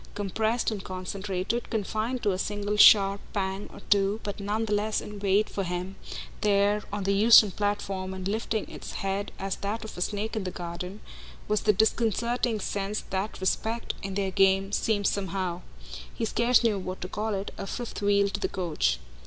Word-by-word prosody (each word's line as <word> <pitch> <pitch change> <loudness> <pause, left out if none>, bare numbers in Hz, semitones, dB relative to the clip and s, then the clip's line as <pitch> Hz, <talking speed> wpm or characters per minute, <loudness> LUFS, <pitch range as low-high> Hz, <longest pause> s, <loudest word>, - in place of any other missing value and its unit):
Compressed 220 +4 0
and 205 -3 -4
concentrated, 190 +4 -3
confined 220 +3 -2
to 205 - +3
a 185 - -2
single 205 +1 -2
sharp 200 -1 +7
pang 195 0 -2
or - - -12
two, 200 +1 +3
but 205 0 -4
none 210 +3 -1
the 210 - -1
less 210 +1 +1
in 210 -1 -8
wait 200 +1 +2
for 195 - -3
him 180 +1 -4 0.5
there 205 0 +3
on 205 -1 -2
the 195 +1 +2
Euston 215 0 +7
platform 195 -1 -2
and 190 0 -4
lifting 220 +1 -1
its - - -8
head 195 +1 -2
as 195 0 -3
that 215 +3 -3
of 220 - -8
a 180 - -6
snake 210 +4 -2
in 215 - -1
the 185 - -2
garden, 180 +2 -6 0.5
was 210 0 +1
the 215 - +4
disconcerting 230 +2 +1
sense 200 +1 -2
that 195 +3 -2
"respect," 220 +5 -1
in 195 -1 -5
their 195 -1 0
game, 195 0 +3
seemed 205 -1 +1
somehow 185 -3 -1 0.5
he 230 - -3
scarce 235 +3 +3
knew 215 -4 +2
what 185 0 -5
to 180 - -5
call 210 +2 -2
it 195 +1 -4
a 195 - -4
fifth 240 +2 -5
wheel 200 0 +3
to 200 0 -3
the - - -1
coach. 155 - 0
200 Hz, 185 wpm, -27 LUFS, 190-215 Hz, 0.5 s, sharp